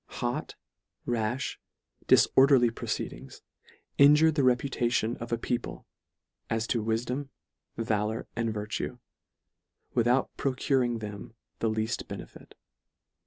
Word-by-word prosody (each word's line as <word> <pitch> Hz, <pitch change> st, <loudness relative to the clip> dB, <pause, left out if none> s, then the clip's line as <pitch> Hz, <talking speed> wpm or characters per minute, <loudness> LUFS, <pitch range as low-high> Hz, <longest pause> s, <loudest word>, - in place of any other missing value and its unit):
Hot, -, -, -2 dB, 0.5 s
rafli, 120 Hz, +2 st, -1 dB, 0.5 s
difor 135 Hz, +1 st, +6 dB
derly 120 Hz, -5 st, +4 dB
proceedings, -, -, -5 dB, 0.6 s
injure 150 Hz, +3 st, +7 dB
the 150 Hz, -2 st, 0 dB
reputation 125 Hz, -2 st, +1 dB
of 115 Hz, 0 st, -7 dB
a 115 Hz, -, +1 dB
people 120 Hz, +1 st, -4 dB, 0.6 s
as 115 Hz, 0 st, 0 dB
to 115 Hz, -2 st, -1 dB
wifdom, 120 Hz, +5 st, -2 dB, 0.5 s
valour 110 Hz, -1 st, -1 dB
and 115 Hz, -1 st, -1 dB
virtue, 105 Hz, 0 st, -4 dB, 1.0 s
without 120 Hz, +2 st, +2 dB
procuring 130 Hz, -2 st, +1 dB
them 105 Hz, 0 st, -8 dB, 0.2 s
the 115 Hz, -, +1 dB
leaft 110 Hz, +1 st, -2 dB
benefit. -, -, -10 dB
120 Hz, 105 wpm, -28 LUFS, 110-130 Hz, 1.0 s, injure